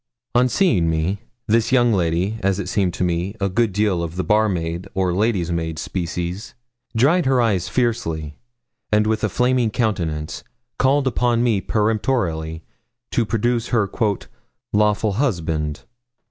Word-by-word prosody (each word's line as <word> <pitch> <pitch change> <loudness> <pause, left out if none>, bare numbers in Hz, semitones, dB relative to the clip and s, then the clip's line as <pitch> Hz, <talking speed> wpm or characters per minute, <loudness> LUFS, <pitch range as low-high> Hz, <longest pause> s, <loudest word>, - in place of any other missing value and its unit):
On 125 +1 +4
seeing 110 - +2
me, 80 +5 0 0.3
this 115 +1 +2
young 120 -3 +4
lady 90 +4 0
as 95 0 +1
it 95 - -3
seemed 95 -1 +1
to 90 - -1
me, 90 +3 -1
a 100 - +1
good 115 +3 +1
deal 100 -3 +1
of 85 0 -4
the 95 - -1
barmaid 95 -5 0
or 95 -2 +1
lady's 95 -3 +1
maid 80 -1 -2
species 90 +4 -4 0.4
dried 155 +7 +3
her 130 -1 +3
eyes 105 -7 +1
fiercely, 80 - -1 0.5
and, 105 0 +3
with 110 0 0
a 110 - +2
flaming 125 +2 +2
countenance, 85 -10 -2 0.4
called 135 +1 +3
upon 120 -2 +1
me 110 -5 +2
peremptorily 105 -8 -1 0.5
to 115 -3 +1
produce 120 +1 0
her 110 -4 +1 0.9
'lawful 105 0 +2
husband.' 80 - -1
105 Hz, 145 wpm, -21 LUFS, 85-115 Hz, 0.9 s, On